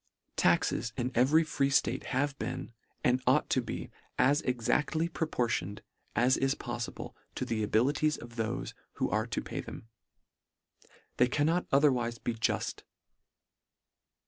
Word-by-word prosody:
Taxes 115 - +2
in 125 0 -1
every 140 +7 +5
free 145 -3 0
ftate 130 -2 +1
have 140 +2 0
been, 115 +1 -4 0.3
and 125 +1 +3
ought 130 +4 +3
to 130 - +3
be 120 - -6 0.3
as 140 +4 +4
exactly 140 +6 +1
proportioned, 120 - -2 0.3
as 125 +2 +4
is 135 0 +1
poffible, - - -5 0.2
to - - -2
the 115 -2 -1
abilities 140 +8 +2
of 120 - -10
thofe 115 -1 -3 0.2
who - - -1
are - - +1
to - - -2
pay - - -4
them. 115 - -10 1.3
They 125 - +5
cannot 155 +7 +1
otherwife 125 -5 +2
be 120 - 0
juft. 115 0 -1
130 Hz, 135 wpm, -31 LUFS, 120-145 Hz, 1.3 s, every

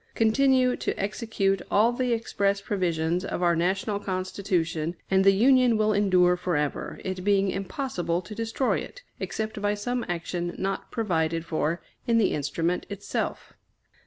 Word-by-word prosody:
Continue 255 +2 +3
to - - -3
execute 200 -2 0
all 220 +4 +4
the 250 0 -1
express 200 -3 0
provisions 175 -4 -1
of 180 - -3
our 170 -1 +4
National 195 +4 0
Constitution, 185 -4 -2 0.2
and 190 0 +4
the 195 - +7
Union 245 +3 +4
will 215 0 +2
endure 185 -3 +4
forever, 165 -5 -2
it 185 -1 -3
being 195 -1 +3
impossible 190 -4 -2
to 210 - -9
destroy 225 +4 0
it, - - -9 0.2
except 215 -1 -4
by 205 0 +1
some 245 +4 -2
action 175 0 -3
not 195 0 -3
provided 165 -7 -1
for 165 0 -1 0.2
in 230 -1 +3
the 215 -4 +3
instrument 165 +4 -1
itself. 200 0 -4
195 Hz, 145 wpm, -26 LUFS, 175-220 Hz, 0.2 s, the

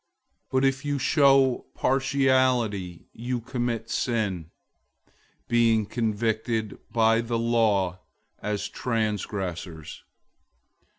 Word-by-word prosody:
002:009 - - -51
But 130 +1 +2
if 135 +1 +1
you 145 -1 -1
show 135 -2 +3
partiality, 130 -9 +1
you 120 +2 -3
commit 120 -2 -3
sin, 100 -9 -1 1.0
being 115 -2 +3
convicted 110 0 -2
by 115 0 +3
the 115 0 -2
law 110 -6 +1 0.4
as 105 -1 -3
transgressors. 100 -8 -3
115 Hz, 85 wpm, -26 LUFS, 105-125 Hz, 1.0 s, show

